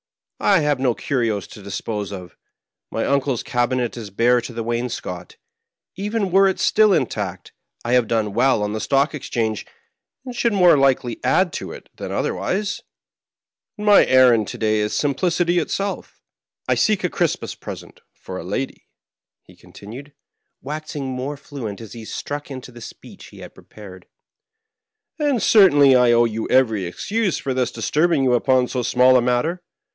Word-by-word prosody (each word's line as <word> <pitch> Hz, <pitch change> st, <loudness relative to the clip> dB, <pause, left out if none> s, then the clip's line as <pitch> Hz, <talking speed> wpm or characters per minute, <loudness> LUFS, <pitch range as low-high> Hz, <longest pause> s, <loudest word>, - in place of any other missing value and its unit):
I. 195 Hz, -5 st, +3 dB
have 145 Hz, -2 st, +1 dB
no 125 Hz, -3 st, +1 dB
curios 115 Hz, -8 st, -1 dB
to 105 Hz, -, -12 dB
dispose 100 Hz, +1 st, -5 dB
of; 90 Hz, -4 st, -9 dB, 0.5 s
my -, -, -2 dB
uncle's 140 Hz, -3 st, 0 dB
cabinet 120 Hz, 0 st, -1 dB
is 115 Hz, -4 st, -7 dB
bare 120 Hz, +5 st, +2 dB
to 120 Hz, -, -8 dB
the 115 Hz, -1 st, -5 dB
wainscot; 115 Hz, -7 st, -4 dB, 0.6 s
even 205 Hz, 0 st, -2 dB
were 195 Hz, +1 st, +5 dB
it 190 Hz, -2 st, -1 dB
still 210 Hz, +3 st, +4 dB
intact, 95 Hz, -, -3 dB, 0.3 s
I 120 Hz, -, 0 dB
have 125 Hz, -3 st, +3 dB
done 110 Hz, -3 st, -1 dB
well 120 Hz, -1 st, +2 dB
on 105 Hz, 0 st, -2 dB
the 110 Hz, -, -3 dB
Stock 140 Hz, +7 st, +1 dB
Ex 150 Hz, -, -7 dB
change, 110 Hz, -3 st, -2 dB, 0.6 s
and 250 Hz, -1 st, -7 dB
should 235 Hz, -1 st, +1 dB
more 180 Hz, -4 st, +6 dB
likely 135 Hz, -4 st, +1 dB
add -, -, +2 dB
to -, -, -5 dB
it -, -, -11 dB
than -, -, -6 dB
otherwise, 200 Hz, +2 st, -2 dB, 1.0 s
and 210 Hz, -, -6 dB
my 205 Hz, -1 st, +7 dB
errand 125 Hz, -5 st, +5 dB
to -, -, -6 dB
day 110 Hz, -1 st, +1 dB
is 105 Hz, 0 st, -1 dB
simplicity 175 Hz, +4 st, +1 dB
itself. 195 Hz, +4 st, -4 dB, 0.4 s
I -, -, +3 dB
seek 215 Hz, -4 st, +1 dB
a 180 Hz, -, +1 dB
Christmas 170 Hz, -3 st, -1 dB
present -, -, -10 dB
for 95 Hz, 0 st, -9 dB
a -, -, -7 dB
lady," 100 Hz, +9 st, -5 dB, 0.6 s
he -, -, -19 dB
continued, 130 Hz, +8 st, -12 dB, 0.5 s
waxing 150 Hz, 0 st, -5 dB
more 130 Hz, +2 st, -4 dB
fluent 130 Hz, -8 st, -7 dB
as 115 Hz, -3 st, -10 dB
he 115 Hz, -2 st, -9 dB
struck 145 Hz, +6 st, -6 dB
into 130 Hz, -2 st, -8 dB
the 120 Hz, -1 st, -13 dB
speech -, -, -12 dB
he -, -, -16 dB
had -, -, -11 dB
pre -, -, -18 dB
pared; 95 Hz, -4 st, -13 dB, 0.6 s
" 440 Hz, -3 st, -55 dB
and 285 Hz, -6 st, +1 dB
certainly 145 Hz, -, +6 dB
I 125 Hz, -1 st, +5 dB
owe 120 Hz, 0 st, +4 dB
you 110 Hz, -1 st, -3 dB
every 110 Hz, -7 st, +2 dB
excuse 200 Hz, -, -2 dB
for 135 Hz, -, -3 dB
thus 125 Hz, -2 st, 0 dB
disturbing 150 Hz, +6 st, +1 dB
you 125 Hz, -1 st, +2 dB
upon 125 Hz, +1 st, +2 dB
so 125 Hz, -, -2 dB
small 125 Hz, +2 st, +4 dB
a -, -, +3 dB
matter. 125 Hz, +9 st, 0 dB
130 Hz, 170 wpm, -21 LUFS, 115-165 Hz, 1.0 s, my